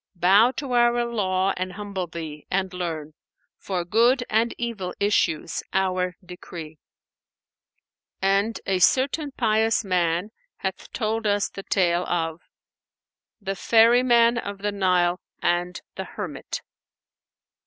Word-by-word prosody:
Bow 195 +7 +5
to 275 0 -5
Our 240 0 +3
Law 195 -5 0
and 185 0 -3
humble 200 -2 -4
thee, 160 -3 -8
and 190 0 -1
learn 160 -4 -4 0.2
* - - -48
For 180 -3 -1
good 240 +7 +3
and 225 +2 +2
evil 230 -6 -4
issues 200 -6 +1
Our 185 -1 0
decree.'"[FN#496] 170 -3 -9 1.5
And 200 +3 +2
a 190 -2 +1
certain 275 - +2
pious 225 -1 +2
man 180 +1 0 0.3
hath - - -5
told 220 -1 -1
us 205 -1 +1
the 195 - -7
tale 180 -3 +1
of 165 -1 -2 1.0
THE 195 -2 -3
FERRYMAN 235 +2 +5
OF 200 -2 -5
THE 205 - 0
NILE 180 -3 +1 0.2
AND 175 +1 -1
THE - - -5
HERMIT. - - -6
195 Hz, 120 wpm, -24 LUFS, 180-225 Hz, 1.5 s, Bow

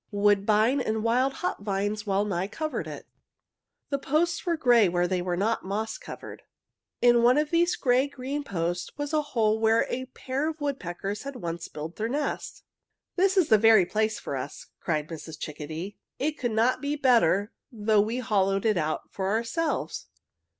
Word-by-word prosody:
Woodbine 210 +5 +3
and 220 -2 -1
wild 250 +4 +2
hop 180 - -2
vines 205 +1 -2
wellnigh 195 -2 0
covered 310 +8 -4
it. - - -8 0.9
The 280 - 0
posts 315 +5 0
were 340 -1 +1
gray 240 - +5
where 175 0 +1
they 185 0 0
were 175 -1 -2
not 220 +4 0
moss 215 +3 -3
covered. - - -9 0.6
"In 240 -1 +6
one 245 +3 +5
of 300 0 +1
these 345 +1 +3
gray 255 +2 +2
green 280 +1 -4
posts 175 -5 -2
was 290 +1 -4
a 305 - +3
hole 225 -7 +1
where 225 0 +3
a 260 +1 -2
pair 265 +3 -3
of 320 0 -7
woodpeckers 205 - -3
had 280 0 -7
once 170 -6 -5
built 155 +3 -7
their 220 +1 -2
nest. 285 +2 -3 0.5
"'This 390 +1 +2
is 355 -5 +4
the 220 - +6
very 220 -3 +6
place 220 +3 0
for 140 - -5
us!' 135 +2 -6
cried 155 -2 -1
Mrs. 160 -1 -8
Chickadee. 155 +6 -6 0.2
'It 300 +3 0
could 255 -6 -3
not 230 +4 +2
be 290 +1 -1
better 230 - +3 0.2
though 215 -2 +2
we 220 +4 -1
hollowed 195 -5 +1
it 215 -3 +3
out 155 -1 -2
for 190 -1 -2
ourselves.'" 235 +10 -1
220 Hz, 175 wpm, -27 LUFS, 195-270 Hz, 0.9 s, In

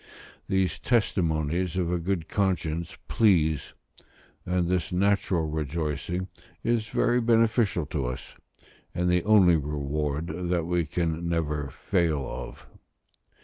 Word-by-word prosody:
These 95 -1 +1
testimonies 90 - 0
of 90 -2 0
a 90 - 0
good 85 -1 -2
conscience 85 -5 -1
please, 80 - +2 0.7
and 90 -1 +1
this 90 -1 0
natural 95 -2 +1
rejoicing 80 +3 -2 0.4
is 115 -2 +1
very 120 0 +2
beneficial 115 -6 +2
to 70 -3 -2
us, 65 - -6 0.6
and 90 0 +1
the 90 -1 +2
only 95 -6 +6
reward 75 +1 -2 0.2
that 85 -2 +1
we 85 -1 0
can 85 0 -1
never 75 -4 -1
fail 75 +1 0
of. - - -7
85 Hz, 115 wpm, -27 LUFS, 80-95 Hz, 0.7 s, only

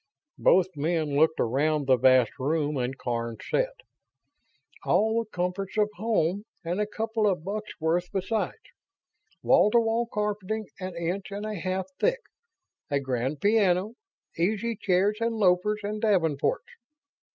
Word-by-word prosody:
Both 185 0 +4
men 155 -1 -1
looked 160 +2 +3
around 145 +5 +1
the 130 -1 +5
vast 130 -2 +4
room 150 +2 0
and 130 0 -2
Karns 115 -2 -3
said: - - +1 1.1
"All 220 +2 +2
the 215 - -22
comforts 180 +2 -3
of 210 0 +2
home 205 -2 0 0.2
and 175 +5 -1
a 210 - 0
couple 220 0 -1
of 180 -5 0
bucks' 210 +3 -5
worth 170 +3 0
besides. 200 +2 -2 0.9
Wall - - +5
to 235 - +4
wall 230 +1 0
carpeting 210 0 -2
an 185 -2 -5
inch 175 +4 -3
and 200 +1 -5
a 215 - -3
half 185 0 -2
thick. - - +1 0.7
A 140 -1 +1
grand 130 +1 -2
piano. 205 -1 +2 0.5
Easy 220 +6 0
chairs 200 +2 +1
and 230 0 0
loafers 210 +1 +2
and 210 +1 -3
davenports. 170 -9 +1
185 Hz, 140 wpm, -27 LUFS, 155-210 Hz, 1.1 s, the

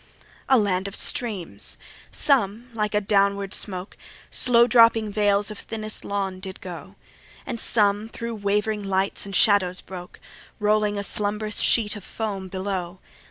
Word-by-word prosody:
A 265 - +6
land 195 -3 +1
of 200 - -3
streams! 210 -8 -1 0.3
some, 240 -3 +1
like 210 -2 -1
a 210 - +3
downward 200 -1 +1
smoke, 185 -1 -3 0.4
Slow 235 -1 +5
dropping 230 -3 +4
veils 205 0 +2
of 210 - -8
thinnest 215 -1 -5
lawn, 195 -2 -3
did 190 0 -8
go; 180 +1 -9 0.5
And 235 - -4
some 210 -1 +2
thro' 230 0 -5
wavering 210 0 -1
lights 195 +1 -1
and 195 - -5
shadows 185 -3 +4
broke, 180 -1 -10 0.4
Rolling 210 0 +2
a 200 - -2
slumbrous 210 +2 -2
sheet 220 -3 +2
of 205 - -9
foam 200 -4 -4
below. 185 -1 -4
205 Hz, 145 wpm, -24 LUFS, 195-215 Hz, 0.5 s, A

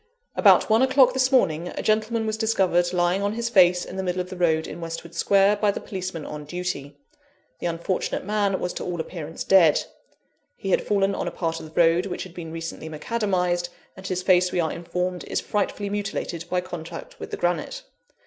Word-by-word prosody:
"About - - +6
one 220 +2 +4
o'clock 260 -1 +5
this 260 0 +2
morning, 170 -10 +2
a - - -5
gentleman 220 +1 +1
was 215 0 -1
discovered 190 -6 +2
lying 180 +1 +1
on 200 +1 0
his 235 +1 -2
face 180 -4 +5
in 190 - -8
the - - -1
middle 180 -1 -2
of 180 0 -4
the - - -5
road, 160 -3 +2
in 170 - -8
Westwood 165 0 -6
Square, 200 +1 +3
by 210 0 +2
the 200 - -1
policeman 185 -5 -5
on 150 0 -6
duty. 145 -3 -5 0.6
The - - -2
unfortunate 170 +3 -2
man 205 -2 +1
was 180 - -2
to - - -5
all 175 -1 -4
appearance 160 -1 -5
dead. 175 -6 +5 0.7
He 195 - -3
had - - +3
fallen 200 -1 +1
on - - -3
a - - +1
part 165 -2 -2
of - - -9
the 155 - -4
road 170 +3 +4
which 180 - -4
had 185 - -11
been 165 -3 -7
recently 165 -1 -6
macadamised; 180 0 -1 0.3
and 190 0 -8
his 185 -1 -2
face, 180 -1 +4
we - - -1
are 160 -2 +1
informed, 180 +1 -3
is - - -1
frightfully 205 0 -2
mutilated 200 -4 -3
by 180 0 +1
contact 170 -2 -8
with - - -7
the - - -4
granite. - - -1
180 Hz, 205 wpm, -24 LUFS, 170-200 Hz, 0.7 s, About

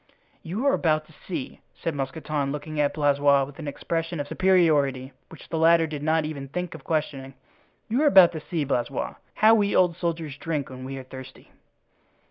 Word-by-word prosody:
"You 195 +8 -4
are 280 - +4
about 155 - +1
to 160 - -20
see," 155 -4 -7
said 165 - -3
Mousqueton, 140 +1 -3
looking 150 +1 -5
at 145 -1 +1
Blaisois 145 -2 +3
with 140 +2 -9
an 155 - -6
expression 165 +3 -3
of 145 - -3
superiority 145 -9 +2 0.2
which 165 - -13
the 160 - -2
latter 165 0 +5
did 150 -2 -6
not 160 +1 +1
even 140 -3 -5
think 180 +4 -4
of 160 -4 -11
questioning, 135 -4 -3 0.5
"you 240 +6 0
are 305 - +4
about 190 -10 +8
to 160 - -5
see, 165 -1 -2
Blaisois, 125 -3 -2 0.2
how 220 +1 +6
we 205 -2 +2
old 180 -2 +4
soldiers 165 -4 -3
drink 150 -4 -3
when 130 0 -8
we 135 +1 -6
are 135 - -7
thirsty." 130 0 -12
155 Hz, 190 wpm, -25 LUFS, 140-170 Hz, 0.5 s, about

